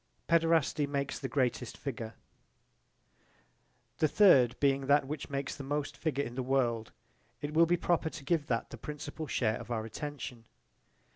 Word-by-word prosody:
Paederasty 165 -3 +3
makes 140 -1 -2
the - - -3
greatest 125 -3 -1
figure 115 -5 -5 1.8
The 155 - +4
third 140 - +5
being 135 -1 +2
that 145 0 +4
which 145 +1 -5
makes 140 -1 -3
the 140 - -7
most 145 +1 -2
figure 140 -3 -1
in 120 - -6
the 130 - -2
world 120 -4 0 0.5
it 145 +1 -4
will 165 +1 +5
be 175 +1 +3
proper 170 -2 +1
to 150 -3 -10
give 160 -2 +1
that 115 -2 -1
the - - -7
principal 150 +1 -6
share 110 -4 +1
of - - -9
our 110 -2 -2
attention. 125 -1 -6
140 Hz, 160 wpm, -31 LUFS, 125-150 Hz, 1.8 s, third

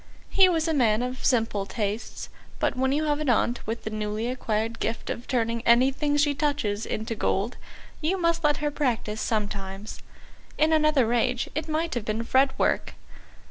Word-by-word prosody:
He 380 -2 +6
was 330 -2 +1
a 325 - +1
man 235 -5 +3
of 250 +1 -5
simple 225 -5 +1
tastes, 210 +2 -4 0.3
but - - 0
when 265 +1 +1
you 295 +3 +1
have 295 -1 0
an 305 -3 -1
aunt 240 0 +2
with 225 +1 -3
the 220 - -4
newly 215 +1 -2
acquired 225 -2 -2
gift 225 +1 -2
of 235 - -6
turning 230 -2 0
anything 265 +5 +3
she 290 0 +3
touches 280 -8 -1
to 220 +1 -3
gold, 210 +2 -1 0.5
you 335 +5 +1
must 335 -1 +1
let 295 -1 +3
her 295 0 -1
practise 235 -7 -1
sometimes. 200 -2 -3 0.6
In 310 +1 +3
another 305 -7 +3
age 245 +1 0
it 310 +2 -3
might 320 +2 -1
have 240 -4 -3
been 220 +2 -1
fretwork. 265 +3 +1
245 Hz, 175 wpm, -26 LUFS, 220-295 Hz, 0.6 s, He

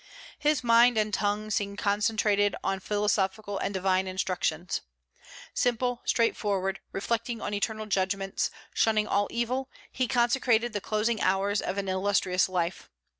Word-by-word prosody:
His 300 -2 +1
mind 235 0 +5
and 215 -1 +1
tongue 210 +1 -1
seemed 200 0 -1
concentrated 205 0 +2
on 195 - -1
philosophical 205 0 -1
and 200 - -1
divine 190 -1 +1
instructions. 185 -2 -2 0.7
Simple, 245 0 0
straightforward, 200 -4 0
reflecting 230 +3 -2
on 210 - -4
eternal 215 +1 -2
judgments, 195 -1 -1 0.2
shunning 215 -1 +2
all 205 -1 +1
evil, 255 +3 -2 0.2
he 255 -1 -1
consecrated 240 -1 +2
the 205 - -2
closing 215 +2 0
hours 195 +2 +1
of 185 - -3
an 200 -1 -2
illustrious 190 -1 +1
life. 175 -1 -2
205 Hz, 130 wpm, -28 LUFS, 195-230 Hz, 0.7 s, mind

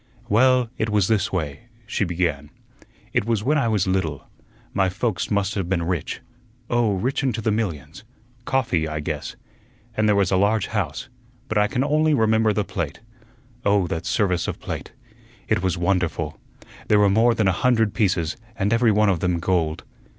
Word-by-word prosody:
"Well, 125 +2 +4
it 110 - 0
was 105 -3 +2
this 110 -2 +1
way," 80 +2 -4 0.2
she 105 -1 -1
began. 85 -5 -1 0.6
"It - - +2
was 115 -3 0
when 150 +5 +2
I 120 - +1
was 105 -4 +1
little. 95 -7 -1 0.5
My 95 -1 +2
folks 105 +2 -2
must 100 0 0
have 95 -5 -3
been 90 -3 0
rich, 85 -1 -3 0.5
oh, 120 -4 +2
rich 125 +10 -1
into 130 -4 -1
the 110 0 0
millions 85 -7 -3 0.4
coffee, 115 -12 0
I 75 0 -3
guess 75 - -4 0.6
and 110 0 +2
there 105 - +4
was 100 -3 +2
a 95 - +3
large 100 +1 +2
house, 95 - -3 0.4
but 110 -3 +1
I 105 - +3
can 125 +5 -1
only 155 +1 +2
remember 110 -2 +3
the 105 0 0
plate. 85 -7 -4 0.6
Oh, 100 -2 +3
that 80 - -3
service 90 -4 +1
of - - -4
plate! - - -6 0.6
It - - +1
was 95 -1 0
wonderful. 85 -4 -1 0.5
There 105 - +4
were 105 0 +5
more 115 +4 +4
than 110 -3 +2
a - - +4
hundred 115 +2 +2
pieces, 90 -5 0 0.2
and 105 +1 0
every 115 -1 +4
one 105 +1 +3
of 95 -4 +2
them 90 -1 0
gold. 85 -2 0
100 Hz, 180 wpm, -23 LUFS, 90-110 Hz, 0.6 s, were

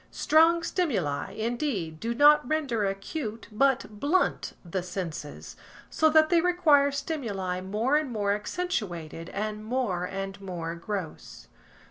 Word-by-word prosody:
Strong 330 +2 +4
stimuli, 195 - -1
indeed, 220 - -2
do 235 +5 -2
not 290 -1 +6
render 275 -9 0
acute, 215 +4 -5
but 270 +4 +2
blunt 325 - +1
the 180 +2 -2
senses, 175 -5 -6 0.4
so 315 - +3
that 310 0 +5
they 345 -2 +4
require 320 -6 +4
stimuli 205 - -3
more 215 +9 +1
and 305 -3 -1
more 205 -3 0
accentuated 205 - -4
and 210 +1 -4
more 215 -7 -1
and 195 +1 -5
more 175 -4 -5
gross. 165 - -6
215 Hz, 125 wpm, -27 LUFS, 185-295 Hz, 0.4 s, not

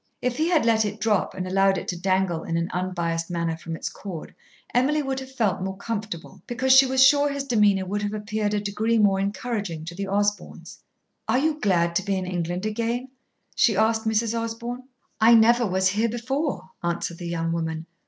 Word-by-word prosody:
If 250 -1 -2
he 320 +2 +1
had 325 -8 +3
let 225 -1 +4
it 210 0 -4
drop 210 -3 0
and 185 -1 -3
allowed 195 +1 +3
it - - -5
to 180 - -2
dangle 185 -2 0
in 165 - -2
an 170 +1 -2
unbiassed 170 -2 -2
manner 170 -2 -1
from 165 0 -6
its - - -5
cord, 180 -6 -8 0.4
Emily 290 +5 +2
would 270 -1 -2
have 265 0 -9
felt 220 -8 0
more 190 0 -4
comfortable, 210 -7 -6
because 255 +2 +2
she 265 0 +7
was 260 0 +5
sure 290 +1 +5
his 280 -1 -3
demeanour 210 -7 +2
would 205 +3 -2
have 205 +1 -2
appeared 210 0 -2
a - - +1
degree 210 +3 0
more 200 -3 +3
encouraging 200 -5 -3
to 165 - -6
the 195 +2 -4
Osborns. 205 +1 -2 0.5
"Are - - +2
you 305 +2 0
glad 170 - +1
to 190 - -2
be 200 -1 -1
in 185 - -3
England 175 +1 -3
again?" 235 +4 -2 0.4
she 220 -5 +3
asked 220 +1 +2
Mrs. 220 +1 +1
Osborn. 235 +2 -4 0.3
"I 230 +2 +7
never 235 +1 +5
was 190 0 +2
here 215 +4 +1
before," 255 -2 -3
answered 170 0 -2
the 175 - -5
young 165 -1 -2
woman. 160 -1 -3
205 Hz, 200 wpm, -24 LUFS, 185-235 Hz, 0.5 s, she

